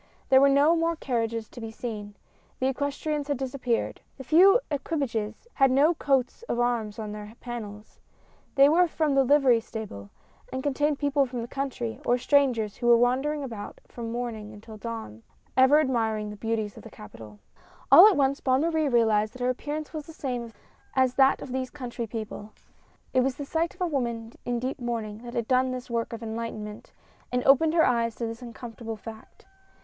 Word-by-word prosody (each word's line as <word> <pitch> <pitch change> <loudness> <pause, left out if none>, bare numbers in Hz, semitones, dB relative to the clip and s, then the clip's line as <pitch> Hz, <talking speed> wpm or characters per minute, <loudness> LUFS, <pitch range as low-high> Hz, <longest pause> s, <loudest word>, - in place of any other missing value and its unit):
There 265 0 +7
were 280 - +6
no 285 +4 +5
more 335 0 +1
carriages 230 -6 -2
to 240 - -11
be 225 - -5
seen 215 -3 -6 0.2
— - - -36
the 260 - 0
equestrians 285 +2 -2
had 285 -2 -1
disap 265 0 -5
peared 235 -2 -1
— - - -39
the 265 - -8
few 370 - +6
equipages 255 - -3
had 270 -2 +4
no 285 +6 +4
coats 270 - 0
of 235 - -1
arms 235 -4 0
on 215 -2 -5
their 210 +1 -8
panels 215 -4 -8 0.3
— - - -34
they 275 0 +7
were 345 +4 +4
from 310 -3 0
the 275 0 +4
livery 265 -3 +4
stable, 210 - -8 0.4
and 260 0 -4
contained 290 +1 +1
people 285 -1 +1
from 245 -2 -4
the - - -6
country, 240 - -4
or 245 - +2
strangers 250 -6 +2
who 240 - -2
were 235 0 +7
wandering 270 +5 +1
about 225 -6 -7
from 230 -1 -6
morning 230 -3 -4
until 215 +1 -11
dawn, 220 - -7 0.3
ever 265 +3 +6
admiring 225 -7 0
the - - -8
beauties 220 -1 -3
of - - -9
the - - -11
capital. 105 0 -12 0.5
All 370 - +11
at 405 -7 +3
once 275 0 +2
Bonne 260 0 +2
Marie 320 -2 +1
realized 220 -3 +2
that 255 - -11
her 250 - +1
appear 290 +4 -5
ance 310 +1 -6
was 305 -2 -6
the 320 - -10
same 245 -6 -4 0.4
as 260 -1 +3
that 270 0 +4
of 265 - -8
these 260 0 -2
country 245 -4 -6
people. 215 -1 -7 0.6
It 255 - +4
was 260 0 0
the 285 - -6
sight 330 +4 -1
of - - -17
a - - +3
woman 235 -7 -3
in 245 0 -1
deep 255 +3 -3
mourning 225 -3 -4
that 240 +1 -9
had 235 -2 -1
done 255 0 +3
this 255 -1 -6
work 230 -1 -1
of 230 0 -7
enlightenment, 220 -2 -6 0.4
and 250 0 0
opened 310 +4 +4
her 325 - +5
eyes 230 -2 +1
to 235 - -3
this 225 +1 -6
uncomfortable 230 -1 -7
fact. 220 0 -12
245 Hz, 200 wpm, -27 LUFS, 225-275 Hz, 0.6 s, All